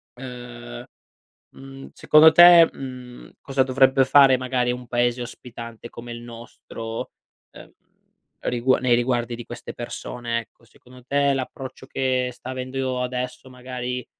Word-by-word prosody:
ehm, 120 - -9 0.7
mhmm, 135 0 -11
secondo 155 +1 +6
te, 175 0 +9
mhmm, 125 -2 -10
cosa 135 -1 -1
dovrebbe 130 0 +3
fare 135 -1 +6
magari 125 -1 -1
un 125 0 -7
paese 120 0 0
ospitante 120 -1 -9
come 120 +1 -10
il 120 - -7
nostro, 115 -1 -8 0.4
ehm, - - -14 0.7
rigua 125 +1 +1
nei 125 -2 +3
riguardi 120 -1 -1
di 120 0 -9
queste 120 - -9
persone, 120 0 -4
ecco, 115 - -23
secondo 125 +2 -18
te 140 +2 +1
l'approccio 130 0 -6
che 130 -2 -1
sta 125 - -11
avendo 130 0 -3
adesso 125 +1 -5
magari 125 0 -6
125 Hz, 130 wpm, -23 LUFS, 120-130 Hz, 0.7 s, te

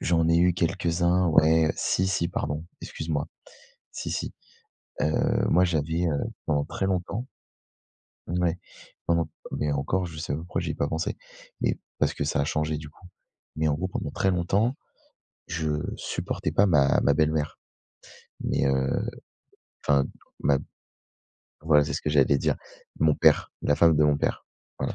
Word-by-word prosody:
J'en 80 -1 +2
ai 85 - +4
eu 90 +1 +4
quelques-uns 85 +1 +1
ouais, 80 0 +4
si, 95 - +1
si 95 -3 0
pardon, 75 -2 -3 0.2
excuse 80 - -7
moi. 75 -2 -1 0.6
Si, - - -5
si, - - -3 0.7
heu, 75 +1 +1
moi 90 +2 +5
j'avais, 80 +1 0
heu, 75 -4 0 0.3
pendant 75 -2 +1
très 95 - -3
longtemps 95 +5 -2 1.0
ouais, 90 0 0 0.5
pendant 85 -2 +2 0.2
mais 75 - -1
encore 90 +6 0
je 80 -2 -9
sais 75 - -3
même 75 +3 -3
pourquoi 85 - -3
j'y - - -3
ai - - -6
pas 70 - -1
pensé, 80 +1 -2 0.4
mais - - 0 0.2
parce - - +1
que - - -2
ça 70 - 0
a - - +1
changé 75 0 -1
du 75 0 -9
coup. 90 - -18 0.5
Mais 80 0 +1
en 75 - +2
gros, 90 +5 -2
pendant - - -4
très 95 - +1
longtemps, 100 +8 +1 0.7
je 80 -2 -2 0.3
supportais - - -3
pas 100 - +4
ma 70 -7 +4
ma - - +4
belle-mère. 75 -1 0 0.8
Mais - - 0
heu 65 -1 +1 0.8
enfin 70 -2 +3 0.4
ma 70 -1 +3 1.0
voilà, 75 -2 +5
c'est 70 - -4
ce 70 - -3
que 75 - -1
j'allais 70 -1 +4
dire. - - +1 0.4
Mon 75 -1 +4
père, - - +3
la 75 - +3
femme 80 -2 +5
de 75 - +4
mon 75 -1 +4
père, - - -2 0.3
voilà, - - -2
80 Hz, 165 wpm, -26 LUFS, 75-85 Hz, 1.0 s, moi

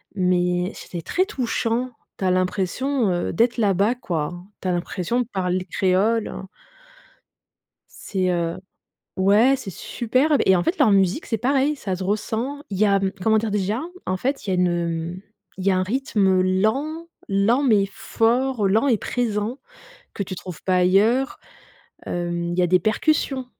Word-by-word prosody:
mais 180 0 +1
c'était 170 -2 -7
très 370 +1 +1
touchant. 250 - -1 0.3
Tu - - -6
as 185 - +3
l'impression, 195 +7 0
heu, 175 0 -1
d'être 235 +6 +2
là-bas, 205 +2 +2
quoi. 170 -8 -3 0.3
Tu 185 - -4
as - - +2
l'impression 180 +6 -2
de 235 - -4
parler 185 -1 -1
créole, 205 +4 +2
heu. 190 - -7 1.6
C'est, 185 -2 -1
heu, 170 -1 -1 0.6
ouais, 210 +8 +4
c'est 230 -7 -7
superbe 255 - 0
et 190 - +5
en 175 - 0
fait, 370 - 0
leur 260 -9 +4
musique, 195 - +2
c'est 225 - -1
pareil, 275 +4 +1
ça 190 -6 -3
se 185 - -5
ressent. 225 +8 -2
Il 195 - -4
y 215 - +4
a, 200 -1 +3
mmh, 190 0 0
comment 220 0 +4
dire 215 -1 -1
déjà, 210 +4 -1 0.2
en 185 0 -1
fait, 270 +4 -2
il - - -4
y - - +1
a - - +2
une, 180 0 +3 0.5
heu, - - -11 0.4
il 190 - -5
y 195 - +4
a 185 - +2
un 185 - +1
rythme 200 -5 +1
lent, 265 - 0 0.2
lent, 215 +8 +2
mais 210 -6 +4
fort, 235 0 +1
lent 220 +8 +2
et 230 - +3
présent, 230 +1 -2 0.5
que 200 - -3
tu 185 - -6
trouves 180 -2 -9
pas 185 -1 +2
ailleurs. 210 +9 +3 0.7
Hem, 175 0 -2
il 180 - -2
y - - +5
a 175 - +3
des 185 +1 +4
percussions. 260 - 0
205 Hz, 180 wpm, -22 LUFS, 185-245 Hz, 1.6 s, et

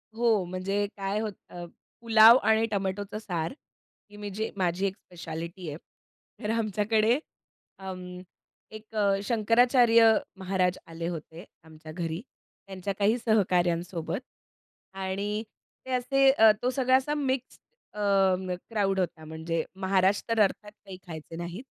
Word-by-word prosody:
हो. 225 -4 +2
म्हणजे 190 +3 -2
काय 195 +1 -2
होतं 215 -2 -4 0.3
अ, - - -6 0.4
पुलाव 225 +1 +8
आणि 220 +1 +3
टोमॅटोचं 200 +1 -2
सार. 175 -3 -3 0.6
ही 205 - -13
मी 205 0 -6
जे 220 +1 -2
माझी 185 0 0
एक 190 - -4
स्पेशालिटी 170 0 -8
आहे. 150 - -6 0.7
तर 210 - -2
आमच्याकडे 215 +3 +1 0.6
अं, 180 -1 -7 0.5
एक 215 0 -12
अ, 200 -2 +2
शंकराचार्य 230 +1 +5 0.3
महाराज 185 -1 0
आले 165 0 -5
होते 165 +1 -7 0.2
आमच्या 155 -1 -12
घरी, 165 +2 -4 0.5
त्यांच्या 195 +1 -4
काही 215 +4 +3
सहकाऱ्यांसोबत. 180 -6 0 0.7
आणि 200 +3 -3 0.4
ते 260 - -7
असे 270 +2 +3
अ, 220 -5 +6
तो 250 - +1
सगळा 260 0 +2
असा 270 +3 -2
मिक्स्ड 265 -3 -2 0.3
अ, 210 - -8 0.4
मग 185 -1 -3
क्राउड 195 -4 0
होता. 165 -3 -3
म्हणजे 160 +1 -3
महाराज 190 +1 +2
तर 230 -1 +1
अर्थात 210 +1 0
काही 195 -2 -12
खायचे 160 -1 -8
नाहीत 175 +6 -6
195 Hz, 135 wpm, -27 LUFS, 180-220 Hz, 0.7 s, पुलाव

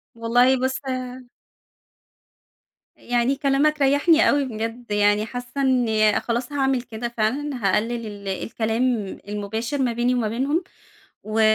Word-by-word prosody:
والله 245 +3 +3
بُصّ 260 - +1 2.3
يعني 245 +2 0
كلامك 285 +2 +1
ريّحني 290 +4 +4
أوي 285 -1 +2
بجد، 230 0 -5
يعني 205 +1 +3
حاسة 245 +4 -5
إن 225 -5 +3
خلاص 240 +3 -3
هاعمل 270 -3 +1
كده 235 0 -5
فعلًا، 255 +7 0 0.2
هاقلل 230 +4 0
ال 205 -1 -9
الكلام 220 +4 -2 0.4
المباشر 220 +6 -3
ما 245 -3 +1
بيني 240 +2 +1
وما 235 -3 0
بينهم، 275 - 0 0.6
و 215 +1 -2
240 Hz, 120 wpm, -23 LUFS, 220-270 Hz, 2.3 s, ريّحني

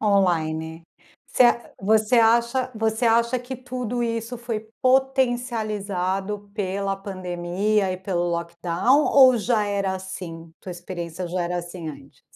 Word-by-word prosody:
On-line. 165 -5 +1 0.4
Você 250 - +4 0.5
você 220 +2 +4
acha 235 +3 +3
você 220 +1 0
acha 235 +2 +3
que 250 +1 -7
tudo 250 -1 -4
isso 230 +1 -3
foi 225 -2 -5
potencializado 215 -7 0
pela 195 -1 -1
pandemia 190 +1 -1
e - - -4
pelo 180 -2 -2
lockdown 170 - +1
ou 260 -3 +7
já 220 -1 +1
era 200 -2 -1
assim, 175 -3 -8
tua 185 - -7
experiência 175 0 -6
já 180 0 -1
era 175 +1 -2
assim 175 -1 -7
antes? 140 -2 -12
200 Hz, 125 wpm, -24 LUFS, 180-235 Hz, 0.5 s, ou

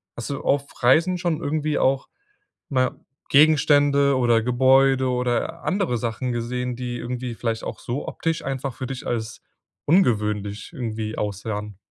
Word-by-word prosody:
Hast 120 - -6
du 140 - -3
auf 140 0 +1 0.2
Reisen 165 +9 +4
schon 170 -2 -1
irgendwie 155 0 -1
auch, 135 +1 +1 0.6
na 130 -2 +2
ja, 130 - -3 0.3
Gegenstände 145 -2 +4
oder 120 -3 +3
Gebäude 130 +2 +4
oder 125 -1 -1
andere 185 - 0
Sachen 120 +2 -2
gesehen, 125 +1 -3
die 120 0 -4
irgendwie 125 0 -4
vielleicht 115 -1 -3
auch - - -5
so 125 +4 -4
optisch 165 0 -2
einfach 135 -1 -3
für 130 -3 -5
dich 130 -1 -6
als 110 -2 -3 0.4
ungewöhnlich 105 - +1
irgendwie 110 -3 -4
aussahen? 105 0 -4
125 Hz, 145 wpm, -23 LUFS, 115-140 Hz, 0.6 s, Reisen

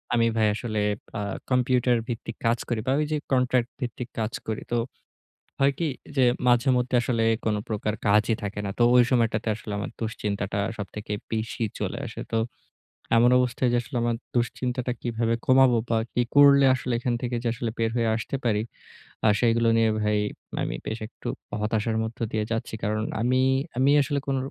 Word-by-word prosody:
আমি 115 -1 +3
ভাই 110 - +4
আসলে 110 -1 -3 0.4
আ - - -2 0.3
কম্পিউটার 125 -1 +3
ভিত্তিক 115 -2 -5
কাজ 115 +1 +3
করি। 120 -2 0
বা - - +3
ঐযে 150 0 0
কন্ট্রাক্ট 125 -1 +2
ভিত্তিক 120 0 -4
কাজ 110 +1 -2
করি। 110 -1 -2
তো 120 - +2 0.8
হয় 140 0 +4
কি 170 - 0 0.3
যে 130 - +5 0.2
মাঝেমধ্যে 125 0 +3
আসলে 115 -2 0 0.2
কোন 105 -1 +1
প্রকার 105 0 -1
কাজই 105 +2 +4
থাকে 105 0 -4
না। - - -2
তো - - +3
ওই 125 - +8
সময়টাতে 115 -2 +1
আসলে 105 0 -7
আমার - - -4
দুশ্চিন্তাটা 105 -3 -3 0.2
সবথেকে 105 +2 -6 0.2
বেশি 110 +1 -2 0.2
চলে - - -2
আসে। - - -7
তো 115 - +2 0.8
এমন 120 +2 +6
অবস্থায় 125 0 +1
যে - - +4 0.2
আমার 120 0 +1 0.2
দুশ্চিন্তাটা 125 +1 -1
কিভাবে 115 -1 0
কমাবো 130 -2 +5
বা 115 - +2
কি 120 - +2
করলে 140 -1 +8
আসলে 125 -1 -3
এখান 120 0 -1
থেকে 120 -1 -1
যে 120 - +2 0.3
বের 115 -1 +1
হয়ে 115 -1 +2
আসতে 115 +4 -3
পারি। 110 -2 +2 0.6
আ - - +6
সেইগুলো 115 -1 +3
নিয়ে 115 -1 +4
ভাই 105 0 +1 0.5
আমি - - -2
বেশ 110 +1 -3
একটু - - -11 0.3
হতাশার 110 +1 0
মধ্যে 110 +1 -4
দিয়ে 110 -1 0
যাচ্ছি। 115 0 -2
কারণ 110 +1 0 0.2
আমি 130 +2 +2 0.4
আমি 135 +2 +4
আসলে 140 0 -1
কোন 135 -1 +1
115 Hz, 170 wpm, -26 LUFS, 110-125 Hz, 0.8 s, ওই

